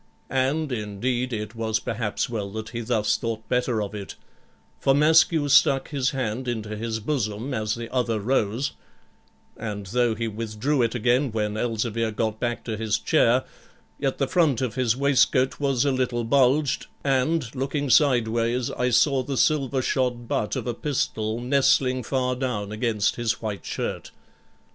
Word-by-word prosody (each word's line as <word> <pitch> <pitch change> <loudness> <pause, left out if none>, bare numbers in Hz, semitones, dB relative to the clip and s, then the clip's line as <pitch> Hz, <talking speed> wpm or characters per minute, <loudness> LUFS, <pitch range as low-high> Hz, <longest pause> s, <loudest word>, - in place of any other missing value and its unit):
And, 135 +3 0
indeed, 120 +3 -2
it 105 -1 -4
was 110 -1 -1
perhaps 110 0 -2
well 110 -5 -4
that 110 0 -5
he 120 0 -5
thus 110 -2 +1
thought 110 -1 -4
better 125 -3 0
of 100 - -6
it, 100 -2 -7 0.6
for 135 - +3
Maskew 155 0 +4
stuck 135 -1 +4
his 135 -3 0
hand 130 -1 -3
into 110 -3 -3
his 110 +1 -3
bosom 110 0 -2
as 110 -3 -1
the 115 0 -6
other 120 -4 0
rose; 115 +2 0 0.8
and 105 -2 -5
though 120 +3 +1
he 115 +1 -2
withdrew 115 +6 -1
it 115 0 0
again 125 +3 +2
when 105 -1 -1
Elzevir 115 0 -1
got 110 0 -2
back 120 -1 -2
to 110 - -3
his 110 -1 0
chair, - - +3 0.6
yet 135 -2 -1
the 135 - +1
front 155 -7 +2
of 125 -4 -2
his 125 -1 +1
waistcoat 135 -1 +2
was 135 -3 +1
a 140 - +3
little 125 -2 0
bulged, 135 +3 +2 0.2
and, 135 -1 +1
looking 140 +1 -2
sideways, 120 -3 +2
I 125 0 0
saw 135 +3 +3
the 135 +1 -4
silver 135 -3 +2
shod 120 -3 -1
butt 105 - -1
of - - -3
a 120 - -1
pistol 110 -5 -2
nestling 130 0 +2
far 125 +1 -1
down 120 -6 -3
against 110 -2 0
his 115 -2 -1
white 105 -3 -5
shirt. - - -4
120 Hz, 160 wpm, -25 LUFS, 110-135 Hz, 0.8 s, Maskew